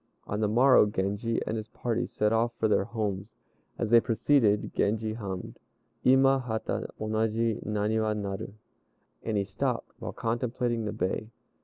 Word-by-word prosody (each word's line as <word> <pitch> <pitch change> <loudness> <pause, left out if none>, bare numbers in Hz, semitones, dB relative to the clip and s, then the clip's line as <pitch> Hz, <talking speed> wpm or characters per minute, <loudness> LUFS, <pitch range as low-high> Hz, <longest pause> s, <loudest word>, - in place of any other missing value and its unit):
On 100 - -3
the 110 - +2
morrow 120 +1 +5
Genji 105 +3 -1
and 110 - -2
his 110 -1 -5
party 120 +1 -2
set 105 +1 0
off 115 +1 +1
for 110 - +2
their 105 -2 +2
homes. 105 -2 -3 0.4
As 115 - -2
they 120 - +8
proceeded 115 -2 +2
Genji 110 +1 0
hummed, 100 -5 -6 0.4
"Ima 135 +1 +5
hata 110 -4 -3
onaji 110 +1 0
Naniwa 105 +1 0
nal," 100 -2 -4 0.7
and 110 -2 -2
he 100 - +2
stopped, 95 0 -2
while - - -5
contemplating 120 0 -1
the 105 - -2
bay. 110 +1 -2
110 Hz, 150 wpm, -28 LUFS, 105-115 Hz, 0.7 s, they